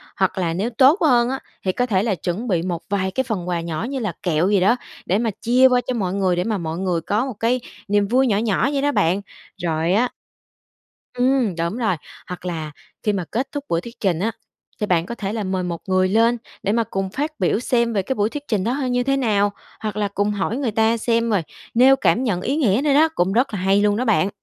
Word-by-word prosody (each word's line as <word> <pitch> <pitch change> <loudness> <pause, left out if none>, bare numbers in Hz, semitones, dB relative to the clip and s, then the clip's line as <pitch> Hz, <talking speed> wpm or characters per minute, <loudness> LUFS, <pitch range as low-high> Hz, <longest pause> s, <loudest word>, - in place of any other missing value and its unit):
hoặc 190 0 0
là 170 -3 0
nếu 200 +7 -1
tốt 265 - +4
hơn 245 -6 +4
á, 265 +1 -2 0.2
thì 185 - +1
có 245 +6 0
thể 200 -5 +1
là 215 -4 0
chuẩn 185 +7 -3
bị 180 -6 +1
một 175 -1 -3
vài 190 -1 0
cái 260 - 0
phần 210 -8 -4
quà 175 -1 -1
nhỏ 165 -2 -4
như 275 -1 -3
là 215 -7 -2
kẹo 175 +1 +1
gì 205 -1 +3
đó 200 +6 +4 0.3
để 190 - +1
mà 230 +1 0
chia 250 +3 +5
qua 250 -1 +3
cho 255 - 0
mọi 190 -6 -1
người, 190 -2 +1
để 175 - 0
mà 215 +1 -1
mọi 165 -2 -4
người 180 -2 -1
có 210 +9 0
một 265 - -4
cái 240 +3 +1 0.3
niềm 205 0 +2
vui 260 +5 +3
nhỏ 205 -4 +2
nhỏ 225 +3 +1
vậy 275 - 0
đó 290 +1 +2
bạn. 180 - +1 0.4
Rồi 165 0 0
á 240 +5 +2 1.0
Ừm, 250 -5 +1
đúng 170 +5 -2
rồi, 220 -7 +1 0.3
hoặc 180 0 -7
là 160 -4 -4 0.3
khi 210 - +1
mà 190 -3 -1
kết 255 +4 -1
thúc 290 -1 -4
buổi 165 - +1
thuyết 235 +5 -11
trình 180 -5 +1
á, 220 +5 0 0.5
thì 210 - 0
bạn 170 -4 +1
có 235 - -6
thể 205 -2 -4
là 220 -2 -2
mời 185 -1 -2
một 170 -2 -4
người 185 0 +3
lên 230 +4 +3 0.3
để 200 - +1
mà 230 +1 +2
cùng 195 -2 -3
phát 290 +10 -2
biểu 190 +2 +2
xem 235 -1 +1
về 200 - +1
cái 195 - -2
buổi 210 -1 +1
thuyết 290 +4 -6
trình 210 -4 0
đó 235 +4 0
h 280 +1 -2
như 245 0 +1
thế 275 +1 +1
nào, 205 -5 +2 0.3
hoặc 215 -2 -4
là 210 -1 +1
cùng 205 +1 -1
hỏi 205 +3 -2
người 265 -5 -1
ta 225 +2 +2
xem 230 0 +1
rồi 205 -5 +2 0.3
nêu 260 +3 +6
cảm 260 -2 +2
nhận 195 -8 0
ý 265 +9 -1
nghĩa 240 -6 +2
nữa 295 -2 +3
đó, 310 +3 +5
cũng 185 +2 +1
rất 245 +1 +1
là 200 - -2
hay 195 +2 +3
luôn 205 0 +3
đó 250 - -1
bạn. 205 -4 +2
210 Hz, 260 wpm, -21 LUFS, 185-245 Hz, 1.0 s, nêu